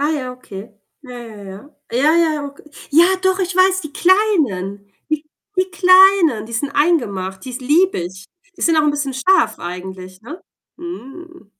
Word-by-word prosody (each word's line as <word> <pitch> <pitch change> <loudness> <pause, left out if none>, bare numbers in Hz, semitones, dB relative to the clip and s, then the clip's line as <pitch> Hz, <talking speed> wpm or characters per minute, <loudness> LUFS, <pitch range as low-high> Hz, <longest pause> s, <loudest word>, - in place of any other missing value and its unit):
Ah 295 +2 +1
ja, 265 -5 -3
okay. 210 -4 -11 0.3
Ja, 255 - -13
ja, 225 -3 -11
ja. 195 +9 -11 0.2
Ja, 290 +7 +2
ja, 330 -2 +3
ja, 295 - -4
ok 280 0 -12 0.3
Ja, 330 +4 +6 0.2
doch, 375 0 +1
ich 365 -1 -2
weiß, 375 0 +4
die 305 -3 -9
Kleinen. 235 - 0 0.2
Die 310 0 -1 0.3
die 370 0 0
Kleinen, 370 - +5
die 230 - -12
sind 275 +5 -2
eingemacht, 205 - -1
die 260 - -7
ist 250 +1 -7
liebe 335 - +2
ich. 185 +3 -8 0.3
Die - - -16
sind 330 -1 +2
auch 310 - +4
'n 295 - +2
bisschen 285 -2 -3
scharf 370 +9 +2
eigentlich, 185 +1 -8
ne? 300 - -10 0.4
Mm. 345 - -10
285 Hz, 180 wpm, -18 LUFS, 210-345 Hz, 0.4 s, Ja